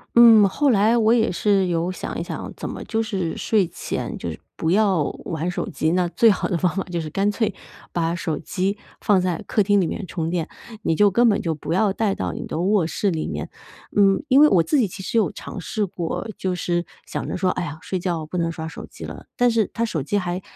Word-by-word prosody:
嗯， 225 Hz, -3 st, +8 dB
后 285 Hz, +5 st, +2 dB
来 220 Hz, +3 st, +4 dB
我 225 Hz, 0 st, +4 dB
也 230 Hz, -4 st, +3 dB
是 195 Hz, +1 st, +2 dB
有 170 Hz, +1 st, 0 dB
想 185 Hz, -, -5 dB
一 -, -, -2 dB
想， -, -, -6 dB
怎 -, -, -5 dB
么 -, -, -6 dB
就 225 Hz, 0 st, -1 dB
是 190 Hz, -7 st, -3 dB
睡 205 Hz, -5 st, +2 dB
前 -, -, -4 dB
就 -, -, -4 dB
是 -, -, -9 dB, 0.2 s
不 160 Hz, -, 0 dB
要 195 Hz, -6 st, +3 dB, 0.2 s
玩 165 Hz, +2 st, -2 dB
手 -, -, -3 dB
机， 155 Hz, -, 0 dB
那 180 Hz, 0 st, +2 dB
最 225 Hz, +6 st, +4 dB
好 195 Hz, -, -1 dB
的 175 Hz, -, 0 dB
方 180 Hz, +1 st, 0 dB
法 195 Hz, -, -1 dB
就 170 Hz, -, -1 dB
是 155 Hz, -2 st, -4 dB
干 195 Hz, +5 st, +1 dB
脆 215 Hz, -2 st, -1 dB, 0.4 s
把 170 Hz, 0 st, 0 dB
手 160 Hz, -4 st, -2 dB
机 195 Hz, +4 st, -2 dB, 0.2 s
放 195 Hz, -3 st, +3 dB
在 180 Hz, -2 st, -1 dB
客 215 Hz, -, +2 dB
厅 205 Hz, 0 st, +3 dB
里 185 Hz, -, +2 dB
面 190 Hz, +4 st, -4 dB
充 165 Hz, -3 st, -3 dB
电， 170 Hz, -3 st, -2 dB, 0.3 s
你 165 Hz, -, +1 dB
就 205 Hz, +2 st, +5 dB
根 235 Hz, +4 st, +4 dB
本 205 Hz, -, +2 dB
就 165 Hz, -2 st, -1 dB
不 155 Hz, +1 st, -4 dB
要 195 Hz, +2 st, +2 dB
带 205 Hz, -1 st, 0 dB
到 -, -, -3 dB
你 -, -, -5 dB
的 155 Hz, -, -3 dB
卧 190 Hz, -2 st, +2 dB
室 200 Hz, +4 st, 0 dB
里 160 Hz, -2 st, -2 dB
面。 -, -, -4 dB, 0.5 s
嗯， 200 Hz, +3 st, +4 dB
因 270 Hz, +2 st, +6 dB
为 300 Hz, -, +8 dB
我 170 Hz, -3 st, +4 dB
自 295 Hz, -, +2 dB
己 230 Hz, -, +3 dB
其 190 Hz, +1 st, -9 dB
实 200 Hz, -, -1 dB
有 190 Hz, -8 st, +1 dB
尝 190 Hz, -, -8 dB
试 210 Hz, +4 st, -1 dB
过， 175 Hz, +2 st, -4 dB
就 185 Hz, -1 st, -2 dB
是 175 Hz, 0 st, -1 dB, 0.2 s
想 -, -, -4 dB
着 -, -, -2 dB
说： 185 Hz, 0 st, +1 dB
“哎 -, -, -2 dB
呀， 155 Hz, -1 st, -5 dB
睡 185 Hz, -, -3 dB
觉 170 Hz, -3 st, -2 dB
不 180 Hz, -, -5 dB
能 165 Hz, -1 st, 0 dB
刷 160 Hz, -1 st, -6 dB
手 160 Hz, -, -8 dB
机 -, -, -10 dB
了。” -, -, -9 dB
但 245 Hz, 0 st, +4 dB
是 225 Hz, -3 st, +2 dB
它 230 Hz, -, 0 dB
手 165 Hz, -10 st, -2 dB
机 175 Hz, +10 st, -1 dB
还 180 Hz, -1 st, -2 dB
185 Hz, 270 characters per minute, -22 LUFS, 170-210 Hz, 0.5 s, 嗯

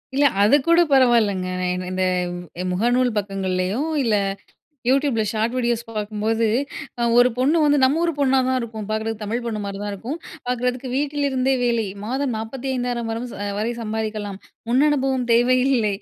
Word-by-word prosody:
இல்ல, 285 Hz, +1 st, +4 dB, 0.2 s
அதுக்கூட 295 Hz, +10 st, +4 dB
பரவாயில்லங்க. 230 Hz, -8 st, +3 dB
நான் 180 Hz, 0 st, -1 dB
இ -, -, -7 dB
இந்த 185 Hz, 0 st, 0 dB, 0.7 s
முகநூல் 245 Hz, +4 st, +1 dB
பக்கங்கள்லேயோ, 195 Hz, +1 st, -1 dB, 0.2 s
இல்ல 225 Hz, -3 st, +2 dB, 0.7 s
Youtubeல 270 Hz, -3 st, +2 dB
ஷார்ட் 225 Hz, +2 st, -1 dB
வீடியோஸ் 240 Hz, -2 st, 0 dB
பார்க்கும்போது, 215 Hz, +1 st, -1 dB, 0.5 s
அ -, -, +1 dB, 0.2 s
ஒரு 245 Hz, +1 st, +7 dB
பொண்ணு 275 Hz, +6 st, +3 dB
வந்து 290 Hz, -1 st, +4 dB
நம்ம 280 Hz, +5 st, +2 dB
ஊரு 335 Hz, -, +1 dB
பொண்ணா 265 Hz, -1 st, +3 dB
தான் 260 Hz, -, +1 dB
இருக்கும், 220 Hz, -3 st, -6 dB
பார்க்கறதுக்கு 220 Hz, 0 st, -2 dB
தமிழ் 230 Hz, +4 st, -2 dB
பொண்ணு 220 Hz, -2 st, -3 dB
மாரி 200 Hz, 0 st, -5 dB
தான் 205 Hz, 0 st, -3 dB
இருக்கும். 240 Hz, +10 st, -5 dB, 0.3 s
பார்க்கறதுக்கு 250 Hz, +1 st, -1 dB
வீட்டிலிருந்தே 275 Hz, -2 st, 0 dB
வேலை. 235 Hz, -2 st, +1 dB, 0.2 s
மாதம் 260 Hz, +3 st, -1 dB
45,000 245 Hz, 0 st, -3 dB
வரும் 235 Hz, +2 st, -4 dB, 0.3 s
வரை 225 Hz, +3 st, -1 dB
சம்பாதிக்கலாம். 215 Hz, -2 st, -4 dB, 0.3 s
முன் 255 Hz, +3 st, +4 dB
அனுபவம் 265 Hz, -4 st, 0 dB
தேவை 245 Hz, +2 st, +4 dB
இல்லை, 225 Hz, -7 st, +2 dB
235 Hz, 150 wpm, -22 LUFS, 215-260 Hz, 0.7 s, ஒரு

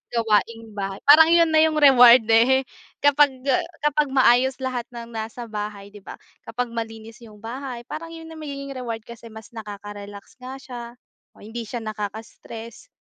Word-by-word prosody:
gawaing-bahay. 215 Hz, -3 st, -1 dB
Parang 310 Hz, +3 st, +8 dB
yon 335 Hz, -1 st, +4 dB
na 315 Hz, -, +4 dB
yung 315 Hz, -1 st, +2 dB
reward, 255 Hz, -5 st, +7 dB
eh 260 Hz, +4 st, +4 dB, 0.4 s
kapag, 285 Hz, -2 st, +3 dB
ah, -, -, +3 dB, 0.2 s
kapag 295 Hz, 0 st, +2 dB
maayos 260 Hz, -1 st, +3 dB
lahat 250 Hz, -2 st, -3 dB
ng 235 Hz, 0 st, -8 dB
nasa 225 Hz, +2 st, -6 dB
bahay, 205 Hz, -1 st, -6 dB
'di 205 Hz, -, -13 dB
ba? 195 Hz, -, -10 dB, 0.3 s
Kapag 235 Hz, +1 st, -3 dB
malinis 225 Hz, -1 st, -7 dB
yung 215 Hz, -2 st, -15 dB
bahay 250 Hz, 0 st, -6 dB
parang 330 Hz, +6 st, -8 dB
yon 325 Hz, 0 st, -11 dB
na 320 Hz, -, -10 dB
magiging 275 Hz, -2 st, -7 dB
reward 235 Hz, -4 st, -6 dB
kasi 235 Hz, 0 st, -12 dB
mas 220 Hz, 0 st, -13 dB
nakaka-relax 205 Hz, -1 st, -10 dB
nga 255 Hz, +1 st, -8 dB
siya, 250 Hz, -3 st, -9 dB, 0.5 s
o -, -, -17 dB
hindi 225 Hz, +1 st, -7 dB
siya 235 Hz, -1 st, -5 dB
nakaka-stress, 220 Hz, -, -8 dB
235 Hz, 160 wpm, -23 LUFS, 220-270 Hz, 0.5 s, Parang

